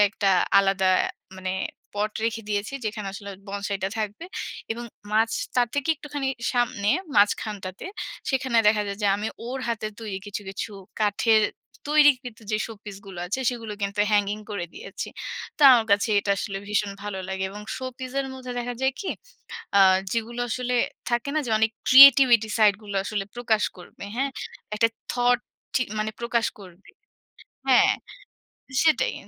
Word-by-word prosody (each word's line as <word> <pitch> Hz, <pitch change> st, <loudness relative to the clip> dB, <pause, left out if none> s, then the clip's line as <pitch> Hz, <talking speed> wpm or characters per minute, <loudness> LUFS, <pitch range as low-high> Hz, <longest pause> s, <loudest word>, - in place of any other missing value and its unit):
একটা 205 Hz, -2 st, 0 dB, 0.3 s
আলাদা 195 Hz, -1 st, +2 dB, 0.5 s
মানে 185 Hz, 0 st, -4 dB, 0.4 s
পট 210 Hz, +1 st, -1 dB
রেখে 225 Hz, 0 st, -1 dB
দিয়েছি। 205 Hz, +3 st, -2 dB
যেখানে 210 Hz, -1 st, -3 dB
আসলে 200 Hz, 0 st, -7 dB, 0.2 s
বসাইটা 200 Hz, -1 st, -2 dB
থাকবে। 215 Hz, +8 st, -3 dB, 0.5 s
এবং 240 Hz, +1 st, -6 dB, 0.3 s
মাঝ 225 Hz, +1 st, +3 dB, 0.3 s
তার 245 Hz, -1 st, +3 dB
থেকে 285 Hz, +1 st, -1 dB
একটুখানি 285 Hz, -2 st, -4 dB, 0.2 s
সামনে, 240 Hz, -5 st, 0 dB, 0.3 s
মাঝখানটাতে; 205 Hz, -, +1 dB, 0.4 s
সেখানে 260 Hz, -2 st, 0 dB
দেখা 210 Hz, 0 st, +3 dB
যায় 200 Hz, 0 st, -5 dB
যে, -, -, +3 dB
আমি 210 Hz, -, -3 dB, 0.2 s
ওর 260 Hz, +2 st, -4 dB
হাতের 215 Hz, -2 st, -2 dB
তৈরি 210 Hz, -4 st, -4 dB
কিছু, 205 Hz, 0 st, -4 dB
কিছু 195 Hz, +3 st, -5 dB, 0.3 s
কাঠের 215 Hz, +1 st, +3 dB, 0.5 s
তৈরিকৃত 270 Hz, -6 st, +4 dB
যে, 215 Hz, -, +2 dB
শোপিস 210 Hz, -2 st, -9 dB
গুলো 190 Hz, -2 st, -9 dB
আছে, 210 Hz, +9 st, -2 dB
সেগুলো 230 Hz, -3 st, -6 dB
কিন্তু 200 Hz, +1 st, -1 dB
হ্যাঙ্গিং 205 Hz, 0 st, +2 dB
করে 200 Hz, -4 st, -3 dB
দিয়েছি। -, -, -7 dB, 0.5 s
তো -, -, -17 dB
আমার 230 Hz, -3 st, +4 dB
কাছে 200 Hz, +3 st, +3 dB
এটা 200 Hz, 0 st, -1 dB
আসলে 195 Hz, -1 st, -3 dB
ভীষণ 210 Hz, -1 st, 0 dB
ভালো 205 Hz, -2 st, -4 dB
লাগে। 190 Hz, 0 st, -3 dB
এবং 205 Hz, +1 st, -8 dB
শো 260 Hz, -, -6 dB
পিস 255 Hz, -1 st, -6 dB
এর 270 Hz, -, -3 dB
মধ্যে 255 Hz, -1 st, -7 dB
দেখা 245 Hz, 0 st, -3 dB
যায় 265 Hz, 0 st, +2 dB
কি? 395 Hz, -, -4 dB, 0.7 s
আ -, -, +7 dB, 0.3 s
যেগুলো 235 Hz, +1 st, -2 dB
আসলে 250 Hz, +1 st, -2 dB, 0.4 s
থাকে 240 Hz, +3 st, 0 dB
না? -, -, +3 dB
যে, -, -, -4 dB
অনেক 220 Hz, 0 st, +3 dB, 0.2 s
ক্রিয়েটিভিটি 255 Hz, -4 st, +9 dB
সাইড 215 Hz, -2 st, +6 dB
গুলো 205 Hz, -1 st, -6 dB
আসলে 205 Hz, 0 st, -2 dB
প্রকাশ 225 Hz, -3 st, +1 dB
করবে, 180 Hz, -, -12 dB
হ্যা? 265 Hz, +3 st, +1 dB, 0.5 s
একটা 230 Hz, +2 st, +4 dB, 0.2 s
থট 245 Hz, 0 st, +3 dB, 0.4 s
ঠি -, -, +3 dB, 0.2 s
মানে 215 Hz, 0 st, -1 dB
প্রকাশ 235 Hz, -1 st, 0 dB
করবে 185 Hz, 0 st, -14 dB, 0.8 s
হ্যা, -, -, +7 dB, 1.0 s
সেটাই। 315 Hz, -1 st, +3 dB
215 Hz, 155 wpm, -25 LUFS, 205-245 Hz, 1.0 s, ক্রিয়েটিভিটি